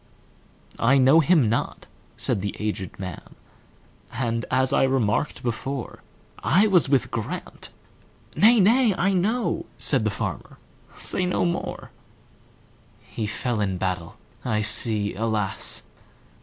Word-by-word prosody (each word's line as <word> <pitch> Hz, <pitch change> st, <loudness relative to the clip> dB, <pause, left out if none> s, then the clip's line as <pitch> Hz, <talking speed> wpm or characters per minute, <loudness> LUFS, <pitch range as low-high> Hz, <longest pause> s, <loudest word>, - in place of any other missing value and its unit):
"I 125 Hz, +4 st, +4 dB
know 135 Hz, +4 st, +6 dB
him 160 Hz, -5 st, +4 dB
not," 115 Hz, -, -2 dB, 0.3 s
said 95 Hz, -, -1 dB
the 100 Hz, 0 st, -4 dB
aged 105 Hz, -4 st, -4 dB
man,"And, 115 Hz, +5 st, -7 dB
as 130 Hz, 0 st, +1 dB
I -, -, +3 dB
remarked 130 Hz, 0 st, 0 dB
before,I 135 Hz, -, -2 dB
was 180 Hz, -9 st, +3 dB
with 130 Hz, -4 st, +1 dB
Grant"—"Nay, 215 Hz, -, -2 dB
nay, 225 Hz, +1 st, +4 dB
I 195 Hz, +2 st, +1 dB
know,"Said 215 Hz, +7 st, 0 dB
the -, -, +1 dB
farmer, -, -, -5 dB, 0.4 s
"say 180 Hz, -, +2 dB
no 180 Hz, -, 0 dB
more:"He 170 Hz, -8 st, -8 dB
fell 115 Hz, +1 st, -2 dB
in 95 Hz, -3 st, -1 dB
battle,—I 105 Hz, +6 st, -4 dB
see, 105 Hz, -1 st, +1 dB
alas! 105 Hz, -1 st, -2 dB
120 Hz, 100 wpm, -24 LUFS, 105-170 Hz, 0.4 s, know